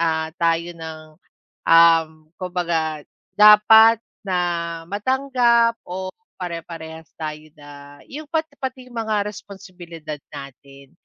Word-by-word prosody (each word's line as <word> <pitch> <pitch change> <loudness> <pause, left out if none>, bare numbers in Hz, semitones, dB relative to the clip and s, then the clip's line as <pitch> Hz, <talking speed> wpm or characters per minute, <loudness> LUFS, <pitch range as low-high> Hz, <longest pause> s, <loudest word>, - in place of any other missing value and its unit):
ah, 160 -1 -1
tayo 170 +1 +1
ng, 160 -1 -9 0.7
um, 165 -1 +6 0.3
kumbaga 170 -4 -2 0.4
dapat 220 +2 +7 0.3
na 170 -2 -2
matanggap 235 0 +2
o 185 +1 -5 0.2
pare-parehas 165 -2 -8
tayo 155 -1 -7
na 145 -1 -14
yung 295 +2 -8
pati 315 -2 -3
pati 265 -1 -4
mga 225 -2 -2
responsibilidad 180 -6 -9 0.2
natin. 140 0 -12
170 Hz, 100 wpm, -21 LUFS, 160-210 Hz, 0.7 s, dapat